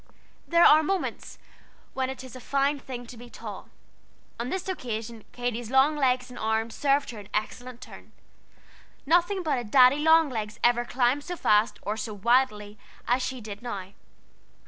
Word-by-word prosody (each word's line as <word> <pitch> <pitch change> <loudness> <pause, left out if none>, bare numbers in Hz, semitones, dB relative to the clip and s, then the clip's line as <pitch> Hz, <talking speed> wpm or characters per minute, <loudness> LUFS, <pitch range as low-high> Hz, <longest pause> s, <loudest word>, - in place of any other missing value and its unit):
There 340 0 +5
are 310 +1 +8
moments 375 +4 -3 0.6
when 260 -1 -1
it 265 0 -7
is 260 -1 -11
a - - -8
fine 280 +3 0
thing 250 -2 -8
to 240 - -11
be 240 +1 -12
tall. - - -9 0.7
On 240 +2 -3
this 380 +4 -4
occasion 230 - -5
Katy's 240 -2 -4
long 265 +4 +4
legs 255 -3 0
and - - -10
arms 220 +1 -1
served 280 -1 +1
her 225 - -9
an 205 0 -12
excellent 245 +3 -4
turn. - - -13 0.9
Nothing 350 +5 +2
but 300 -6 0
a - - -5
Daddy 255 +5 +5
Long 320 +1 +5
Legs 215 -4 -5
ever 240 0 +3
climbed 250 +3 +1
so 355 +2 -5
fast 210 -7 +2
or 210 +2 -3
so 215 -1 -5
wildly 210 -2 +1 0.3
as 245 +2 +2
she 260 -1 -4
did 210 -1 -8
now. 200 -6 -6
250 Hz, 170 wpm, -26 LUFS, 220-280 Hz, 0.9 s, are